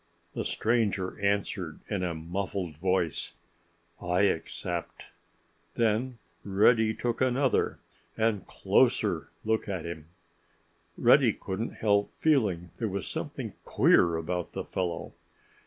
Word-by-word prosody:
The - - -2
stranger 110 -5 0
answered 100 -5 -1
in 100 -3 -2
a 90 -2 -1
muffled 90 0 -3
voice, 90 -1 0 0.7
"I 90 +1 +1
accept." 85 -2 -2 0.6
Then 115 +2 +1 0.3
Reddy 110 +3 +4
took 120 0 -2
another—and 120 -4 0
closer—look 110 -1 +1
at 95 -4 -3
him. 80 -2 -7 0.9
Reddy - - +5
couldn't 100 +5 -4
help 100 -2 +2
feeling 105 - +2
there 115 - -1
was 95 -2 -4
something - - -5
queer 85 -1 +4
about 85 +2 -3
the - - -3
fellow. 90 -3 -3
100 Hz, 105 wpm, -29 LUFS, 90-110 Hz, 0.9 s, Reddy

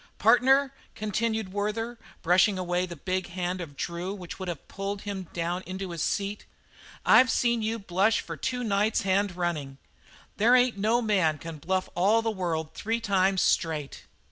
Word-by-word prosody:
"Partner," 265 +3 +4 0.2
continued 215 -1 -2
Werther, 225 +3 -2 0.2
brushing 185 +4 +4
away 180 0 -1
the 175 - -7
big 185 +4 -2
hand 180 +1 -3
of 145 -5 -9
Drew 175 +3 -3
which 180 -2 -9
would 190 - -5
have 170 -5 -6
pulled 195 +1 -5
him 195 -3 -5
down 175 +1 -2
into 185 0 -5
his 170 -2 -4
seat; 200 +1 -2 0.6
"I've 255 0 +7
seen 235 -2 +2
you 220 +1 -1
bluff 200 +1 +1
for - - -3
two 250 -1 -3
nights 210 0 +1
hand 195 -1 +1
running. 155 -6 -3 0.6
There 235 +4 +5
ain't 250 -4 +3
no 225 +4 +2
man 185 -8 +2
can 160 0 -8
bluff 185 +4 -1
all 205 +6 +3
the 225 - 0
world 165 -6 -3
three 225 +2 -2
times 195 -3 +2
straight." 155 -6 0
195 Hz, 170 wpm, -27 LUFS, 175-220 Hz, 0.6 s, I've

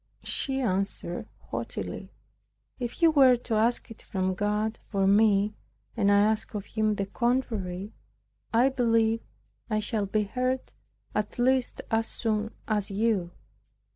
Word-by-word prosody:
She 270 -1 0
answered 195 -5 -1 0.2
haughtily, - - -5 0.7
"If 245 +7 -4
you 330 - +7
were 265 -4 +7
to 240 -1 -5
ask 230 +2 +1
it 225 - -10
from 190 -2 -1
God 210 +3 -1
for 195 -2 +1
me, 205 0 +4 0.4
and 205 -3 +3
I 200 0 +6
ask 215 +1 +1
of 205 -1 -3
Him 215 -1 0
the 200 -1 -1
contrary, 215 -5 -1 0.6
I 240 +4 +4
believe 230 -3 +2 0.5
I 215 -1 +1
shall 210 -1 -1
be 210 +2 +1
heard 255 +4 -2 0.4
at 210 -1 -2
least 255 +1 +1
as 225 0 +2
soon 220 -1 -1 0.2
as 210 -3 0
you." 200 -3 +1
220 Hz, 140 wpm, -28 LUFS, 205-240 Hz, 0.7 s, you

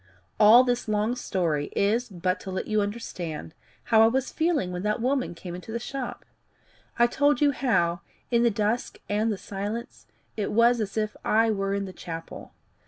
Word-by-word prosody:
All 225 +4 +8
this 245 -2 -1
long 215 +3 0
story 170 -11 -1
is 225 +5 +1
but 185 0 -1
to 195 - -8
let 185 - -3
you 215 -1 +1
understand 180 -7 -5 0.3
how 220 -1 +4
I 225 - +7
was 260 +3 0
feeling 315 - 0
when 180 0 -4
that 210 +3 0
woman 255 -5 0
came 175 +1 -8
into 180 +5 -8
the 230 - -2
shop. 260 +2 -6 0.7
I 240 - +6
told 285 +2 +2
you 290 -1 +4
how, 175 -11 +1 0.3
in 235 -1 +3
the 235 - +4
dusk 215 +3 -1
and 215 +2 +1
the 205 - -2
silence, 205 +5 -6 0.3
it 210 -2 -2
was 235 +1 +4
as 205 0 -4
if 215 -1 -1
I 225 +1 +3
were 195 -1 -1
in 200 0 -2
the 190 - -8
chapel. 165 -3 -8
215 Hz, 185 wpm, -26 LUFS, 195-240 Hz, 0.7 s, All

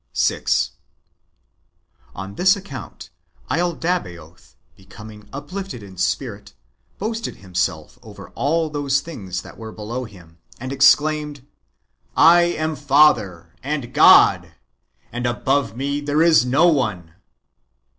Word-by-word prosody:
6. - - 0 1.4
On 95 +2 -7
this 185 - +3
account, 140 - -10 0.4
laldabaoth, 90 - -3 0.2
becoming 105 +2 -14
uplifted 145 - -7
in 95 -2 -12
spirit, 105 +1 -3 0.4
boasted 225 +2 -4
himself 95 -2 -4
over - - -12
all 155 +5 -1
those 140 -2 0
things 95 - -7
that - - -14
w^ere 110 -1 -9
below 115 +4 -5
him, 85 -6 -16 0.2
and 130 +2 -5
exclaimed, 145 0 +2 0.4
" - - -44
I 175 +1 +7
am 160 -2 -2
father, 135 - +2
and 135 -3 -4
God, - - +6 0.6
and 120 0 -3
above 135 +1 -1
me 140 +2 -2
there 145 +2 +1
is 160 -6 +5
no 140 +7 +3
one." 105 - -1
135 Hz, 115 wpm, -21 LUFS, 100-155 Hz, 1.4 s, I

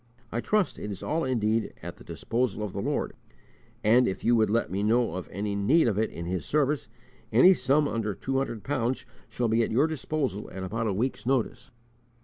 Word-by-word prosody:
I 120 - -1
trust 210 - +1
it 105 - -5
is 100 -2 -6
all 160 +2 0
indeed 115 -3 0
at - - -7
the - - -14
disposal 115 -3 -2
of 105 - -4
the - - -3
Lord; - - -1 0.7
and, 120 +4 +5
if 95 - -3
you 120 - +4
would 110 -2 +3
let 115 -2 +1
me 95 +2 -1
know 115 +3 +2
of 95 -1 -5
any 100 +2 -2
need 125 +10 +3
of 105 -2 +1
it 110 - +1
in 85 - -7
His 90 -1 -2
service, 150 -1 0 0.4
any 155 - +7
sum 145 -3 +2
under 110 -5 -2
two 135 +5 -1
hundred 115 -6 -3
pounds 130 -3 -1 0.2
shall 120 - -1
be 115 +1 +2
at - - +1
your 130 +7 +3
disposal 150 -8 -2
at 95 - -6
about 115 +4 -2
a 100 - 0
week's 120 +4 -2
notice." 130 +1 0
115 Hz, 210 wpm, -27 LUFS, 105-135 Hz, 0.7 s, any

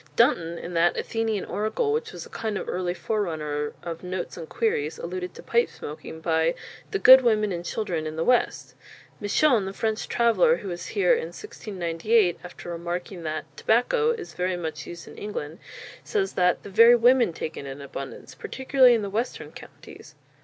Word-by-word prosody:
Dunton, 170 - +3
in 175 - -7
that 170 +1 +3
Athenian 225 -3 -1
Oracle 425 - -1
which 455 0 -2
was - - -8
a - - -14
kind 220 -2 -3
of - - -5
early 180 -1 -2
forerunner 160 -6 -2
of 165 -1 -5
Notes 180 0 -5
and 165 -3 -8
Queries, 165 -10 -1
alluded 180 +1 -5
to - - -11
pipe 235 +1 +2
smoking 155 +1 -9
by 160 0 +1 0.3
"the 405 - -1
good 260 -7 +9
Women 215 -4 +2
and 175 -1 -3
Children 175 -5 -3
in 155 - -5
the 160 - -1
West." 250 +4 +1 0.5
Misson, 220 +1 +3
the 195 - -5
French 220 +1 -2
traveller, 240 - +3
who 195 - -7
was 175 0 -5
here 410 +5 +5
in 475 0 -1
1698, 190 - -1
after 175 0 -9
remarking 175 +2 -5
that 155 -1 -3
"Tabacco" 445 - +2
is 450 -6 -3
very 180 0 -1
much 155 -4 -5
used 170 -1 -9
in - - -11
England, 170 -5 -5 0.4
says 395 -3 -1
that 180 -1 +2
"the 200 - -9
very 230 +4 +8
Women 240 -2 +4
take 160 -1 -5
it 140 - -7
in 135 +1 -7
abundance, 140 -1 -8
particularly 260 -2 +3
in 220 - -1
the 200 - -3
Western 230 +5 -3
Counties. - - -13
190 Hz, 180 wpm, -25 LUFS, 170-235 Hz, 0.5 s, good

